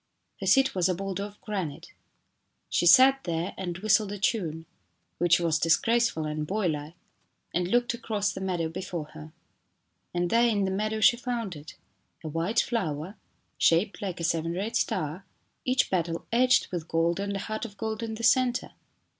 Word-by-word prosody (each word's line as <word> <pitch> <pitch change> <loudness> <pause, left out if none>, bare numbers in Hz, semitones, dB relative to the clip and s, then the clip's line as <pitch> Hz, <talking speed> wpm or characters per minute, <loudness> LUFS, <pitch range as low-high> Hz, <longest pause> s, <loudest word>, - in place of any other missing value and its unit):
Her - - -4
seat 270 -1 +4
was 185 -1 +1
a 185 - +1
boulder 195 +1 -4
of 205 0 -12
granite. 190 -9 -5 0.8
She 175 - +2
sat 265 +9 +7
there 170 +1 -2
and 175 -2 -4
whistled 215 +1 +2
a 205 - -4
tune 170 -6 -1 0.5
which 170 0 +4
was 165 -2 +1
dis 165 -1 +4
graceful 230 -9 +1
and 150 0 -3
boylike 165 -6 -2 0.6
and 175 0 0
looked 240 +4 +1
across 210 -4 -2
the 190 - -7
meadow 180 -4 -1
before 165 -2 -5
her. 155 +1 -10 0.8
And 175 0 -1
there 235 +1 +4
in 205 -4 +1
the 190 - -1
meadow 215 +3 -1
she 235 - +6
found 235 -6 -3
it 150 +1 -11 0.5
a - - -5
white 165 +8 +1
flower, 180 - -3 0.4
shaped 175 +5 +2
like 185 -4 -4
a - - -4
seven 165 0 0
rayed 200 +6 -3
star, 155 +5 -1 0.4
each 255 +1 +1
petal 170 -2 -1
edged 250 +2 +3
with 170 -3 -4
gold 165 +2 +1
and 200 0 -2
a - - -2
heart 215 +2 -4
of 205 -3 -7
gold 220 +1 -3
in 225 -1 -4
the 230 - -8
centre. 250 +1 +2
190 Hz, 180 wpm, -27 LUFS, 165-220 Hz, 0.8 s, sat